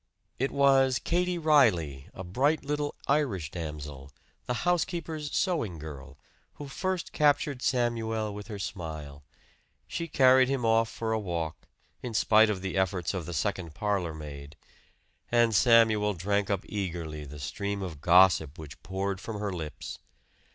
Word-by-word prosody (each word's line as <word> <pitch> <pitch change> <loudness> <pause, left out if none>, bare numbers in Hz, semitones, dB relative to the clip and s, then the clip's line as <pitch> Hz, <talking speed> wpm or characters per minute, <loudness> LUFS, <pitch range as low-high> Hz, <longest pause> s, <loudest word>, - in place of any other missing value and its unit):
It 135 +2 +1
was 135 -2 +4
Katie 180 +4 0
Reilly, 105 - +3
a 95 - -8
bright 140 - +1
little 145 0 -2
Irish 120 - 0
damsel, 75 -4 -7 0.4
the 125 - -1
housekeeper's 165 -3 -1
sewing 150 - 0
girl, 70 -2 -9 0.4
who 145 - -8
first 185 +5 -3
captured 145 -3 +2
Samuel 115 -4 0
with 105 0 -8
her 105 -3 -6
smile; 80 -7 -6 0.6
she 170 - -4
carried 130 -3 +5
him 135 -3 -1
off 115 0 +3
for 115 -1 -3
a 110 - +1
walk, 85 -6 -4 0.3
in 120 -3 -5
spite 110 +1 +5
of 95 -3 -2
the 95 0 -3
efforts 95 -1 0
of 90 -5 -4
the 85 - -5
second 85 -2 -2
parlor 100 -6 -1
maid, 75 -1 -9 0.8
and 120 -1 +4
Samuel 110 -2 +4
drank 100 +3 0
up 100 -1 -1
eagerly 85 -6 -4
the 75 +1 -9
stream 100 +8 -3
of 80 -6 -7
gossip 85 -4 +5
which 75 -2 -10
poured 95 0 -3
from 110 -1 -5
her 100 -2 -2
lips. 80 -4 -6
100 Hz, 150 wpm, -28 LUFS, 85-130 Hz, 0.8 s, carried